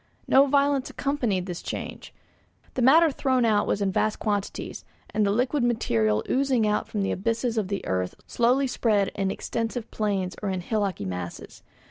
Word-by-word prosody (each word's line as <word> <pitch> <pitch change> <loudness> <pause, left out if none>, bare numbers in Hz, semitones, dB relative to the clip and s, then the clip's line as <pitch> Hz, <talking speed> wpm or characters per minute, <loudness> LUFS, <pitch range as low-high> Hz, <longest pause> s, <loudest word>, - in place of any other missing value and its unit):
No 275 +1 +6
violence 280 -1 +2
accompanied 240 -10 -1
this 180 -2 -5
change; - - -6 0.6
the 255 - -2
matter 310 +6 +6
thrown 260 -3 +1
out 210 -2 +2
was 200 - 0
in 195 - +1
vast 215 +3 0
quantities, 205 -2 -3 0.3
and 215 - +2
the 200 - +2
liquid 250 +5 +1
material 110 - +1
oozing 260 -4 +2
out 210 0 0
from 205 -2 -2
the - - 0
abysses 230 +4 -1
of 215 -4 0
the 200 0 -3
earth 90 -1 -1
slowly 250 +4 +2
spread 215 -6 +1
in 195 -1 -2
extensive 230 +3 -3
plains 195 -4 -1
or 205 - -2
in 185 -1 -2
hillocky 200 - -2
masses. 90 -2 -6
215 Hz, 170 wpm, -26 LUFS, 195-255 Hz, 0.6 s, No